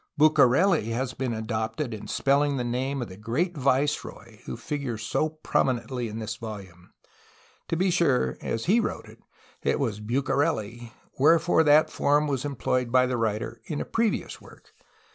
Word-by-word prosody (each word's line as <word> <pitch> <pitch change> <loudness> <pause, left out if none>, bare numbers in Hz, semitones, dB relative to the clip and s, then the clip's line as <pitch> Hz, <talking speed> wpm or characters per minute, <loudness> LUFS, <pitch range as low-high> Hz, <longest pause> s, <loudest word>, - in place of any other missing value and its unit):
"BucareU" 155 - +5
has 130 +2 -2
been 130 -2 -3
adopted 110 +3 -3
in 105 - -7
spelUng 140 +1 +1
the 125 - -1
name 130 +2 -2
of - - -7
the 95 - -10
great 140 - -1
viceroy 135 -4 -1
who - - -5
figures 125 -4 -4
so 155 +8 0
prominently 130 -5 -1
in 110 0 -6
this 110 -1 -5
volume. 95 -6 -9 0.8
To 165 - -1
be 185 +1 +2
sure, 165 -8 +2
as 115 - -3
he 210 +7 +4
wrote - - -3
it, - - -15 0.4
it - - 0
was 115 -7 -1
"Bucarely," 120 -1 -1 0.3
wherefore 160 +3 +4
that 150 +1 +5
form 145 +1 +2
was 140 -2 -2
employed 130 -3 -1
by 130 0 +5
the 125 0 -1
writer 110 0 -2
in 145 - -4
a - - -3
previous 225 -2 -1
work. - - -17
130 Hz, 160 wpm, -26 LUFS, 115-145 Hz, 0.8 s, BucareU